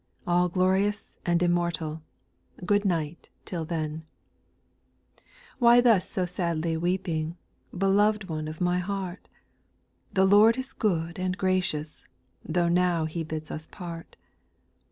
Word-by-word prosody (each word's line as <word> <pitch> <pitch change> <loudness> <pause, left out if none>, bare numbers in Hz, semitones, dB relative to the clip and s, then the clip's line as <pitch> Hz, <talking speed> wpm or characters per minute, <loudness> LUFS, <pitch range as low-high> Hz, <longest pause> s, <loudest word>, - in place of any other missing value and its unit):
All 175 +1 +2
glorious 190 +3 0
and 175 0 +3
immortal; 170 -2 0 0.6
Good 205 +2 +2
night 165 -3 -2 0.2
till 170 -3 -4
then 155 -2 -2
I 160 +1 -18
8. - - -37 0.4
Why 240 -1 +7
thus 225 -7 +3
so 185 - -1
sadly 170 -2 -1
weeping. 170 -1 -1 0.4
Beloved 200 +2 +2
one 155 -2 -4
of 155 0 -7
my 180 0 +1
?ieart? 190 -1 -5 0.8
The 190 0 +3
Lord 210 +4 +6
is 260 +1 -5
good 170 -4 -1
and 185 0 -1
graciouSi 185 -6 -1 0.4
Tho' 170 +1 0
now 175 -1 +2
He 165 +1 -3
bids 155 0 -6
us 155 0 -6
part. 170 -3 -9
175 Hz, 130 wpm, -27 LUFS, 160-190 Hz, 0.8 s, Why